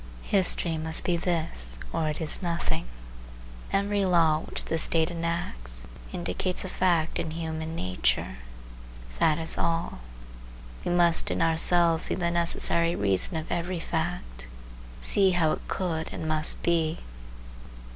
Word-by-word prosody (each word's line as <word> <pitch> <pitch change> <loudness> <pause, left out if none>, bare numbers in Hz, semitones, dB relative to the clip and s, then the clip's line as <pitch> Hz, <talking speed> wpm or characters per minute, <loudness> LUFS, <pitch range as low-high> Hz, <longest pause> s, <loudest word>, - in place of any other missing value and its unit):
History 175 -4 +2
must 160 +1 0
be 175 - +1
this 160 - 0 0.2
or 155 -1 0
it 150 - -3
is 160 +3 +3
nothing. 170 - -1 0.9
Every 200 0 +1
law 165 -4 +4
which - - -4
the 165 - -1
state 160 +1 +2
enacts 165 - -4 0.3
indicates 90 - -2
a - - -5
fact 175 -4 +1
in 160 - -2
human 160 0 -4
nature; 90 - 0 0.8
that 155 - +4
is 160 -1 +3
all. 165 - -1 0.8
We - - -2
must 175 -1 +3
in - - -1
ourselves 165 0 +3
see - - -1
the 170 -2 0
necessary 170 0 +1
reason 100 - +1
of 160 - -6
every 175 +1 -2
fact,—see - - -2
how 160 -3 +3
it - - -4
could 165 -4 -2
and 160 - -5
must 155 0 0
be. 165 -1 +1
165 Hz, 135 wpm, -27 LUFS, 155-175 Hz, 0.9 s, law